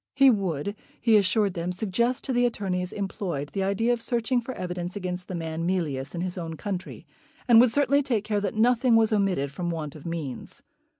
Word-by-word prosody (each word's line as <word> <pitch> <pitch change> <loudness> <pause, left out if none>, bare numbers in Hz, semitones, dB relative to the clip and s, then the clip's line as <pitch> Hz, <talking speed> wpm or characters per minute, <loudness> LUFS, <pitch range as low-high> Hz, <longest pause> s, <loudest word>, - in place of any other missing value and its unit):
He 275 -1 +7
would, 195 - -1 0.2
he 230 -3 +4
assured 205 0 +3
them, 175 0 -3
suggest 225 +6 -1
to 265 - -2
the 245 0 +3
attorneys 185 -5 -2
employed 180 -7 -4
the 195 - -1
idea 200 +5 +1
of 235 - -3
searching 240 +1 0
for 235 - -6
evidence 180 -2 -4
against 180 -2 -4
the 185 - -5
man 165 -1 -3
Mealyus 150 -6 -2
in 170 - -3
his 185 0 -3
own 165 -1 -5
country, 185 +2 -5 0.4
and 235 -2 +8
would 250 - +5
certainly 285 +3 +3
take 240 -7 0
care 210 -1 -1
that 200 0 -2
nothing 240 +2 +4
was 225 -1 +4
omitted 190 -9 +1
from 175 +4 -3
want 160 -3 -4
of 155 +1 -9
means. 160 -7 -6
195 Hz, 200 wpm, -26 LUFS, 175-230 Hz, 0.4 s, and